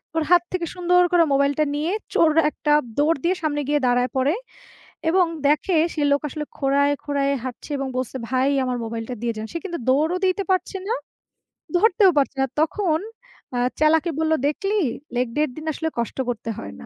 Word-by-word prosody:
ওর 325 Hz, -, +1 dB
হাত 350 Hz, -1 st, +6 dB
থেকে 360 Hz, -2 st, -1 dB
সুন্দর 360 Hz, 0 st, +3 dB
করে 350 Hz, -1 st, +5 dB
মোবাইলটা 280 Hz, +2 st, +2 dB
নিয়ে 305 Hz, +4 st, -1 dB, 0.2 s
চোর 325 Hz, -2 st, +4 dB, 0.2 s
একটা 300 Hz, -, -2 dB, 0.3 s
দৌড় 300 Hz, +2 st, +3 dB
দিয়ে 360 Hz, +2 st, +2 dB
সামনে 295 Hz, -1 st, 0 dB
গিয়ে 295 Hz, 0 st, +3 dB
দাঁড়ায় 245 Hz, +1 st, +2 dB
পড়ে। 265 Hz, +4 st, +2 dB, 0.8 s
এবং 365 Hz, +2 st, +4 dB, 0.2 s
দেখে 305 Hz, +5 st, +2 dB, 0.2 s
সে 305 Hz, -, -3 dB
লোক 285 Hz, -, +3 dB
আসলে 300 Hz, +2 st, -5 dB
খোঁড়ায়, 280 Hz, +1 st, +2 dB
খোঁড়ায় 280 Hz, -1 st, 0 dB
হাঁটছে 255 Hz, +3 st, -7 dB
এবং 275 Hz, -, -3 dB
বলছে, 255 Hz, 0 st, -3 dB
"ভাই 260 Hz, +2 st, +2 dB
আমার 250 Hz, -1 st, -1 dB
মোবাইলটা 225 Hz, +2 st, -5 dB
দিয়ে 235 Hz, -1 st, 0 dB
যান।" 215 Hz, -, -4 dB
সে -, -, -2 dB
কিন্তু 345 Hz, -3 st, -4 dB
দৌড়ও 310 Hz, +7 st, +2 dB
দিতে 375 Hz, +2 st, +1 dB
পারছে 370 Hz, +1 st, 0 dB
না। 465 Hz, -, +1 dB, 0.8 s
ধরতেও 425 Hz, -1 st, +5 dB
পারছে 280 Hz, -1 st, +2 dB
না। 270 Hz, -, +2 dB
তখন 320 Hz, 0 st, +1 dB, 0.5 s
অ্যা 245 Hz, -, -1 dB, 0.2 s
চ্যালাকে 315 Hz, +2 st, +3 dB
বললো, 320 Hz, 0 st, +2 dB
"দেখলি 390 Hz, +7 st, -1 dB, 0.4 s
লেগ 245 Hz, 0 st, +1 dB
ডের 300 Hz, -1 st, +2 dB
দিন 310 Hz, -, -7 dB
আসলে 320 Hz, +2 st, -2 dB
কষ্ট 235 Hz, -, -3 dB
করতে 230 Hz, -1 st, -4 dB
হয় 100 Hz, 0 st, -8 dB
না।" -, -, -10 dB
300 Hz, 185 wpm, -23 LUFS, 270-340 Hz, 0.8 s, হাত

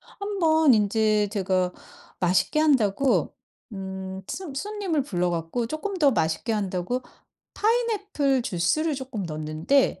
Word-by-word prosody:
한 -, -, -19 dB, 0.2 s
번 315 Hz, -4 st, +5 dB
인제 215 Hz, 0 st, +2 dB
제가 185 Hz, -3 st, 0 dB, 0.5 s
맛있게 185 Hz, -, +2 dB
한다고 265 Hz, -4 st, +2 dB, 0.4 s
음 190 Hz, -1 st, -6 dB
손 345 Hz, -8 st, -6 dB
손님을 390 Hz, -2 st, -2 dB
불러 180 Hz, -9 st, -1 dB
갖고 170 Hz, +8 st, -2 dB
쪼끔 345 Hz, -, -4 dB
더 300 Hz, -6 st, +4 dB
맛있게 160 Hz, +7 st, 0 dB
한다고 200 Hz, +3 st, -2 dB, 0.5 s
파인애플 410 Hz, -, +1 dB
주스를 240 Hz, -, 0 dB
쪼끔 260 Hz, -6 st, -5 dB
넣었는데 155 Hz, -, 0 dB
230 Hz, 260 characters per minute, -25 LUFS, 190-310 Hz, 0.5 s, 번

